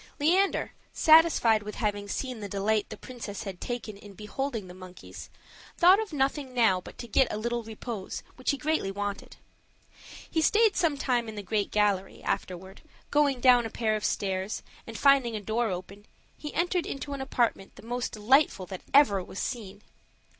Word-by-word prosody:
Leander, 365 +7 +2 0.2
satisfied 315 -9 +5
with 210 0 -7
having 205 -2 -2
seen 255 +2 -4
the 205 -1 -6
delight 205 +2 0
the - - -8
princess 230 -6 -7
had 190 -3 -7
taken 240 -3 -5
in 200 0 -13
beholding 220 +2 -4
the 180 - -10
monkeys, 185 0 -11 0.5
thought 365 +4 +6
of 440 -3 -4
nothing 270 -2 -1
now 220 -7 +3
but - - -12
to 240 - -7
get 260 +3 +2
a - - -3
little 235 +2 -2
repose, 220 -2 -6
which 255 - -4
he 280 - +2
greatly 300 -6 -1
wanted. 200 0 -5 0.9
He 320 - 0
stayed 435 +6 +4
sometime 265 -8 0
in 220 - -8
the 205 - -6
great 205 +1 -1
gallery; 205 -2 0
afterward, 190 +2 -4 0.3
going 290 -3 +2
down 245 -1 +6
a - - -9
pair 220 -1 0
of 210 - -4
stairs, 190 +1 -2 0.2
and - - -7
finding 275 -5 +4
a - - -2
door 220 +3 -1
open, 195 +3 -7 0.3
he 295 - -7
entered 350 0 0
into 275 +1 -5
an 275 - -5
apartment 240 -7 -1
the - - -14
most 245 +2 -3
delightful 215 -2 +2
that 185 0 -8
ever 205 -10 +5
was 190 - -11
seen. 210 -5 -5
225 Hz, 175 wpm, -28 LUFS, 200-275 Hz, 0.9 s, thought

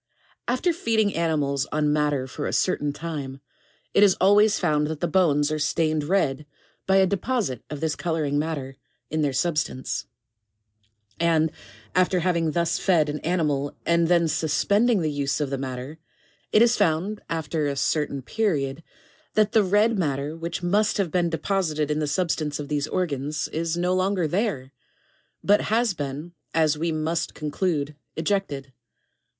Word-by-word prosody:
10. 240 - +2
After 345 +7 +1
feeding 220 - +1
animals 145 -5 0
on 150 0 +1
madder 150 -3 +1
for 140 +3 -5
a - - -3
certain 145 -5 +1
time, 145 -3 -6 0.5
it - - +4
is 200 -3 +6
always 205 +3 +5
found 150 -4 +1
that 155 -1 -4
the 175 - 0
bones 155 -4 +2
are 155 - -1
stained 155 0 0
red 150 -5 0 0.4
by 190 - +4
a 190 0 +6
deposite 200 - -1
of 150 -1 -6
this 160 -2 0
coloring 155 -4 -1
matter 145 -4 -4 0.3
in 155 0 0
their 145 -2 +1
substance; 150 -2 -1 1.1
and 160 -2 +2 0.4
after 185 0 +2
having 170 -2 +1
thus 170 +1 0
fed 165 -6 +3
an 150 +1 -3
animal, 150 -5 -1
and 170 0 +3
then 170 -1 +3
suspending 200 +8 +2
the 155 - 0
use 145 0 -1
of 145 -2 -2
the 135 - -1
madder, 130 +3 -6 0.5
it 215 - +6
is 235 0 +4
found, 195 +2 0
after 160 -2 -1
a 140 - -2
certain 140 -1 -1
period, 155 - -1 0.5
that 215 -1 +3
the 220 -2 +4
red 205 +3 +2
matter 145 -2 -1
which 170 +2 -5
must 205 +4 +2
have 190 -6 0
been 175 -2 +1
deposited 160 -3 -1
in 150 - 0
the 150 - -1
substance 155 -2 -1
of 145 - -6
these 145 0 -1
organs, 150 -5 -2
is 165 +1 -2
no 180 +1 +1
longer 185 -2 +1
there, 155 - -1 0.7
but 205 +1 +4
has 225 -1 +2
been, 145 +2 -5 0.2
as 160 -2 +3
we 165 +2 -1
must 160 +1 -2
conclude, 150 -1 -2 0.2
ejected. 155 -7 -2
160 Hz, 160 wpm, -25 LUFS, 145-185 Hz, 1.1 s, is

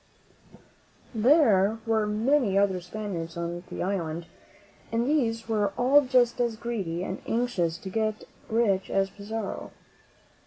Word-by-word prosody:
There 225 - +4
were 220 -2 +1
many 220 0 +2
other 195 -2 +2
Spaniards 175 -3 -5
on 170 0 -3
the - - -4
island, 170 -3 -2 0.7
and 230 +1 +1
these 230 -6 0
were 210 -3 0
all 270 +4 +5
just 250 -2 +2
as 235 -2 0
greedy 200 -7 -3
and 185 - -5
anxious 220 -9 0
to 190 +1 -8
get 215 0 -1 0.3
rich 215 -4 +1
as 195 0 +1
Pizarro. 210 +1 -5
215 Hz, 125 wpm, -27 LUFS, 190-235 Hz, 0.7 s, all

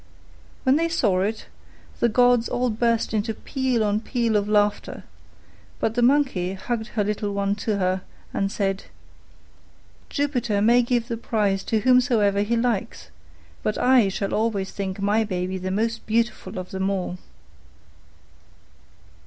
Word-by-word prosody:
When 260 +2 +4
they 335 +1 +1
saw 210 - +1
it, 215 +3 -2 0.5
the 235 - +3
gods 245 0 +3
all 250 -1 0
burst 230 0 0
into 220 +1 -1
peal 260 -4 -1
on 210 0 +1
peal 235 -2 0
of 205 0 +1
laughter; 205 -1 0 0.8
but 220 - 0
the 245 - 0
Monkey 245 -9 +2
hugged 220 +4 -3
her 210 - +3
little 205 0 -2
one 200 0 0
to 210 -1 -1
her, 185 -1 0 0.3
and 195 0 -1
said, 195 -3 -2 1.2
"Jupiter 245 -7 0
may 235 +4 +5
give 240 -1 0
the 230 -2 -3
prize 205 -4 0
to 220 -2 0
whomsoever 230 -5 +3
he 230 +3 0
likes: 230 -4 -2 0.5
but 215 - -1
I 250 -5 +4
shall 195 +1 -3
always 210 -3 -1
think 195 -1 -4
my 205 +3 +2
baby 185 -2 -3
the 185 +1 -4
most 225 +4 -2
beautiful 220 -3 -1
of 185 0 -6
them 190 0 -1
all." 185 -2 -3
215 Hz, 145 wpm, -24 LUFS, 200-240 Hz, 1.2 s, may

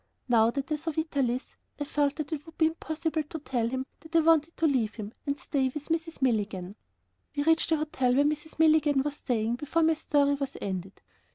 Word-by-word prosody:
Now 230 -2 +5
that 275 +5 -4
I 305 - +2
saw 325 +2 -4
Vitalis, 280 -6 -1 0.2
I - - 0
felt 290 0 0
that 305 0 -4
it 295 -2 -4
would 325 - -13
be 320 - +4
impossible 320 0 -1
to 305 +2 -7
tell 245 -6 -1
him 260 +1 -2
that 320 +1 -11
I 330 - +7
wanted 325 0 +3
to 330 - +1
leave 255 -8 +1
him 215 -1 -7
and 280 0 -1
stay 270 -3 0
with 300 +3 -7
Mrs. 330 -3 -2
Milligan. 205 -6 0 0.6
We 285 - +1
reached 325 +1 +3
the 320 - +3
hotel 265 -5 +1
where 285 +2 +4
Mrs. 305 +1 -2
Milligan 310 -3 +4
was 290 0 -3
staying, 230 -2 -1
before 310 +4 0
my 320 0 +5
story 290 -2 +2
was 275 -1 -3
ended. 190 -1 -5
290 Hz, 210 wpm, -28 LUFS, 250-315 Hz, 0.6 s, I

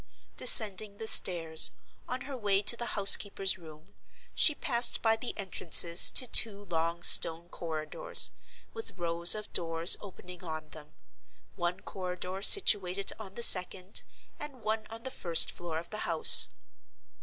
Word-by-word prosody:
Descending 210 -4 +1
the 220 - -9
stairs, 165 -6 +4 0.4
on 255 +1 -8
her 270 +1 -10
way 205 -4 -3
to 210 - 0
the 235 -1 -9
house 200 -1 +6
keeper's 195 -2 -5
room, 155 -2 -18 0.4
she 305 - +1
passed 245 -7 -2
by 225 -1 0
the 240 +2 -10
entrances 175 -3 +2
to 255 - +3
two 210 -4 -1
long 170 -1 -6
stone 170 +1 +4
corridors, 170 - +1 0.4
with 450 - -10
rows 170 +1 +4
of 210 -1 -12
doors 165 0 +1
opening 180 -2 -15
on 155 -2 -10
them; 150 -1 -17 0.6
one 175 +1 -6
corridor 185 0 -10
situated 200 - +1
on 200 -3 -13
the 235 - -4
second, 185 0 +2 0.4
and 275 -6 -11
one 215 0 -6
on 225 +1 -14
the 260 - -9
first 170 -7 -1
floor 170 -2 -10
of 170 +1 -12
the 215 - -8
house. 165 -5 +3
190 Hz, 150 wpm, -26 LUFS, 170-220 Hz, 0.6 s, house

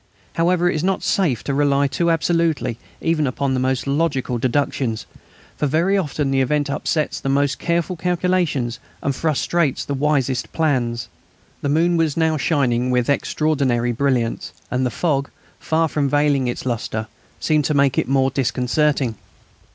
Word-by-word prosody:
However, 175 +1 +2
it - - +2
is 155 - -2
not 190 0 0
safe 155 - +1
to 140 - -2
rely 140 0 +2
too 170 +5 0
absolutely 165 -7 +1 0.2
even 160 -3 +1
upon 135 +1 -1
the 130 - 0
most 130 0 0
logical 140 -4 0
deductions, 130 -3 -1 0.5
for 150 - 0
very 170 +8 +2
often 150 -6 -1
the 135 0 +2
event 145 +2 0
upsets 155 +2 -1
the 135 - -3
most 140 0 +1
careful 170 +1 0
calculations 175 -8 0 0.2
and 140 - 0
frustrates 155 0 0
the 140 - -3
wisest 135 -2 0
plans. 120 -7 0 0.5
The 145 - -1
moon 170 +4 +2
was 160 -2 +1
now 160 -1 +2
shining 125 -5 +1
with 125 +1 +2
extraordinary 140 -5 +1
brilliance, 120 -6 -1 0.2
and 130 0 +1
the - - -1
fog, 140 0 -1 0.3
far 160 +1 +1
from 145 -2 0
veiling 145 -2 +2
its 120 - -4
lustre, 110 -2 -2 0.3
seemed 155 -2 +1
to 150 - +1
make 140 -2 +3
it - - -1
more 135 0 +2
disconcerting. 130 -1 0
140 Hz, 160 wpm, -21 LUFS, 130-160 Hz, 0.5 s, make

